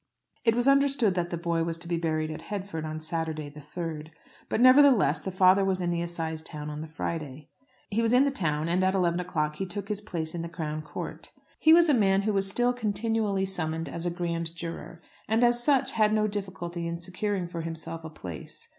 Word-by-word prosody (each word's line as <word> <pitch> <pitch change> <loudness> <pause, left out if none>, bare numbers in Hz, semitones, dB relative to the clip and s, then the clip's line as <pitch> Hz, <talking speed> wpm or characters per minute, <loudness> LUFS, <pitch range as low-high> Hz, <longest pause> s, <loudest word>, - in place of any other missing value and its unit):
It 225 -1 +3
was 245 +2 +1
understood 275 -6 +4
that 175 -1 -1
the 170 - -3
boy 170 -1 0
was 165 0 -1
to 170 +1 -6
be 170 - 0
buried 155 -2 -1
at 155 - -7
Headford, 185 -3 -5
on 155 0 -4
Saturday, 155 -2 -3
the 150 +1 -12
3rd; 155 0 -6 0.4
but, - - 0
nevertheless, 255 - +6
the 190 - -5
father 185 +1 +5
was 190 -1 +1
in 175 -1 -1
the 170 0 -1
assize 165 -2 -3
town 150 -2 -6
on 150 0 -6
the 160 - -6
Friday. 155 -2 -5 0.4
He 220 +3 +1
was 230 -1 +2
in 255 +3 +5
the 280 - +1
town, 160 - -1
and 180 +2 +1
at 190 +1 +2
eleven 175 -2 +1
o'clock 150 -4 -2
he 195 - -2
took 200 +2 -5
his 210 -1 -1
place 165 -6 -4
in 170 - -3
the 170 - -5
Crown 155 -2 -4
Court. 155 - -7 0.3
He 315 - +5
was 335 +1 +7
a 300 - +4
man 195 -4 +3
who 215 0 0
was 195 -1 +2
still 245 +5 +2
continually 215 -3 0
summoned 165 -4 -2
as 170 +5 -4
a - - +2
grand 170 -1 -3
juror, 170 0 -7 0.3
and 225 +3 +2
as 240 0 +4
such 275 -2 +3
had 215 -1 +3
no 215 0 +2
difficulty 180 -4 -4
in 170 0 -3
securing 185 +2 -2
for 170 -1 -5
himself 165 0 -5
a 160 - -6
place. 90 - -8
175 Hz, 225 wpm, -28 LUFS, 160-205 Hz, 0.4 s, was